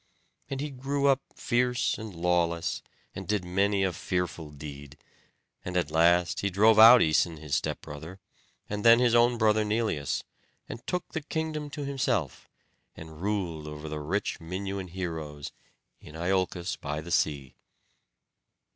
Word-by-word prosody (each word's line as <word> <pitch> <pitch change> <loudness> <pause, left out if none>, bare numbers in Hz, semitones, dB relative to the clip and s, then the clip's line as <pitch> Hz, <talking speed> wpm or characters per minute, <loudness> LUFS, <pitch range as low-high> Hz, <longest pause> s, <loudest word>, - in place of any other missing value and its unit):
And 135 0 -3
he 150 0 -4
grew 140 +2 -2
up 135 -1 +4
fierce 125 0 +1
and 110 -4 -8
lawless, 85 -1 0 0.3
and - - -7
did 105 -4 0
many 100 +2 +1
a 95 -2 0
fearful 85 -2 -3
deed; 75 0 -10 0.7
and 90 0 -3
at 85 -4 0
last 85 +2 +3
he 100 - 0
drove 110 +4 +5
out 115 +2 +10
Æson 80 +1 +2
his 75 -2 -7
stepbrother, 80 +6 -4 0.5
and 105 0 -4
then 115 0 +8
his 120 -1 +3
own 120 0 +4
brother 110 -1 +3
Neleus, 105 -9 -1 0.4
and 115 - -8
took 180 -1 -2
the 160 - -2
kingdom 155 -1 -3
to 145 0 -5
himself, 125 - -2 0.5
and 80 0 -10
ruled 90 -7 -2
over 75 +1 -7
the 75 0 -4
rich 85 +8 -2
Minuan 95 +3 -5
heroes, 80 -5 -5 0.5
in 75 - -13
Iolcos 90 +1 -1
by 75 +1 -4
the 85 +3 -8
sea. 70 -6 0
90 Hz, 145 wpm, -28 LUFS, 80-115 Hz, 0.7 s, out